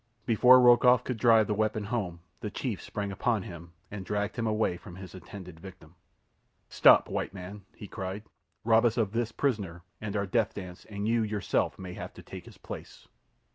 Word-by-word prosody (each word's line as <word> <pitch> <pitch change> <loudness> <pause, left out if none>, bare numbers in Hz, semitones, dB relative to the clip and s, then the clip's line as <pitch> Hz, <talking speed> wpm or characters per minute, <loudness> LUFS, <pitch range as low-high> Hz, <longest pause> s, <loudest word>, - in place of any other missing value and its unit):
Before 125 +2 +7
Rokoff 125 0 +6
could 125 -2 -3
drive 115 -2 +5
the 105 - -1
weapon 110 0 0
home 100 -6 -3 0.2
the 105 - -4
chief 115 -1 -4
sprang 100 -1 -4
upon 110 +1 0
him 85 -1 -10 0.2
and 100 -2 -6
dragged 105 +2 -2
him 115 -2 -2
away 110 -4 +1
from 85 0 -11
his 95 -2 -10
intended 90 -2 -10
victim. 90 -3 -13 0.8
"Stop, - - +6
white - - -3
man!" 95 +2 -9
he 105 - -9
cried. 95 +1 -5 0.4
"Rob 115 +1 +4
us 120 0 +2
of 110 -4 +1
this 115 0 -1
prisoner 100 -11 -2 0.2
and 105 -1 -4
our 100 -1 0
death 110 +2 0
dance, 90 -3 -8
and 100 0 -4
you 115 0 +2
yourself 105 -2 -1
may 90 -2 -7
have - - -8
to - - -12
take - - -10
his - - -14
place." - - -10
105 Hz, 190 wpm, -29 LUFS, 95-115 Hz, 0.8 s, Before